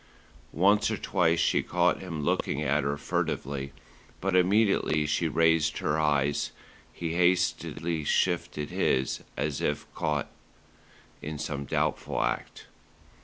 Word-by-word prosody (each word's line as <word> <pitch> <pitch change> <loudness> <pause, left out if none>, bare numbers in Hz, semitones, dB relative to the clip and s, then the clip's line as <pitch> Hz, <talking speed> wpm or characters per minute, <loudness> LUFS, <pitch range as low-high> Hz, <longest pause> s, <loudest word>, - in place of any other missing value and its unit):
Once 100 +6 +3
or - - -1
twice 85 -1 +1
she - - +3
caught - - +1
him 85 -5 -5
looking 70 -1 0
at 75 0 +1
her 70 +1 -1
furtively; 70 -1 -2 0.5
but 95 0 0
immediately 95 -5 +3
she 80 +3 0
raised 80 0 +2
her 75 +2 0
eyes, 75 -2 +1 0.4
he 85 -1 -4
hastily 85 -2 +1
shifted 75 -2 0
his, 65 0 0 0.2
as 75 -2 -2
if 75 - -1
caught 75 -2 -2 0.9
in 75 0 -5
some 70 -1 -4
doubtful - - -1
act. - - -3
75 Hz, 120 wpm, -28 LUFS, 75-85 Hz, 0.9 s, Once